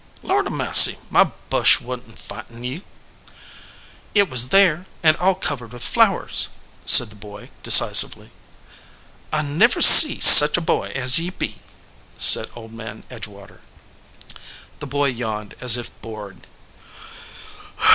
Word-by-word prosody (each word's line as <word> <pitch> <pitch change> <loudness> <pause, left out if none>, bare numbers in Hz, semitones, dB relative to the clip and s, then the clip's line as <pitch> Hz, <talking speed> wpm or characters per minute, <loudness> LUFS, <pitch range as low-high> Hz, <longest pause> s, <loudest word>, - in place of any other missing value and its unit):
"Lord - - -5
a - - -10
massy, - - +3
my - - 0 0.3
bush - - -1
wa 125 - -12
n 125 - -12
t 115 - -25
fightin 115 +2 -16
ye." 130 +8 -11 1.3
"It 200 -6 -3
was 125 0 0
there, 185 -1 -2 0.2
and 155 -1 0
all 190 +1 -4
covered 125 - -8
with 120 - -13
flowers," - - -3 0.4
said 120 - +5
the - - -19
boy, 105 0 -18
decisively. - - +1 1.0
"I 155 0 -5
never 165 +12 -3
see 305 - +7
such 150 +3 +7
a - - -5
boy 165 - -7
as 130 +2 +1
ye 170 +2 -9
be," 185 - -11 0.6
said - - +4
Old 115 -1 -17
Man 115 0 -15
Edgewater. 105 -4 -17 1.2
The 145 - -12
boy 145 +1 -6
yawned 110 -4 -10
as 125 -1 +1
if 120 0 -12
bored. 105 -3 -16
125 Hz, 135 wpm, -15 LUFS, 115-155 Hz, 1.3 s, see